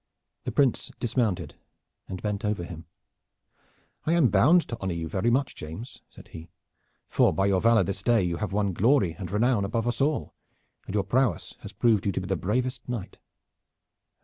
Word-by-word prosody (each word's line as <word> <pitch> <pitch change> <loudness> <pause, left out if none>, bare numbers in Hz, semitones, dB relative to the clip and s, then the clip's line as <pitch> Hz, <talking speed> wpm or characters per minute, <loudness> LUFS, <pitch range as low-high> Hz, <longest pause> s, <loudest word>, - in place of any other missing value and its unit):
The - - -2
Prince 135 -5 +2
dismounted 115 -5 -1 0.5
and 95 - -7
bent 105 -1 -2
over 105 -4 -1
him. 85 -2 -9 1.2
"I 165 - +3
am 165 -8 +4
bound 150 - +4
to 115 - -4
honor 95 -3 -2
you 80 -1 -3
very 95 +8 0
much, 130 +2 +1
James," 80 - -9
said - - -15
he, 80 +2 -10 0.6
"for - - +3
by 95 - +1
your 95 -2 +2
valor 115 -2 +5
this 95 +2 -3
day 115 0 +3
you 85 -1 -1
have 105 +1 -3
won 100 -1 0
glory 105 - +3
and 90 - -5
renown 110 +1 +2
above 115 +4 -1
us 120 0 -1
all, 145 +1 0 0.5
and 95 - -4
your 100 - +2
prowess 125 +7 0
has 105 - -9
proved 105 -1 +2
you - - +2
to - - -2
be - - -6
the 95 0 0
bravest 125 +9 -2
knight." 115 -7 -5
105 Hz, 185 wpm, -27 LUFS, 95-120 Hz, 1.2 s, valor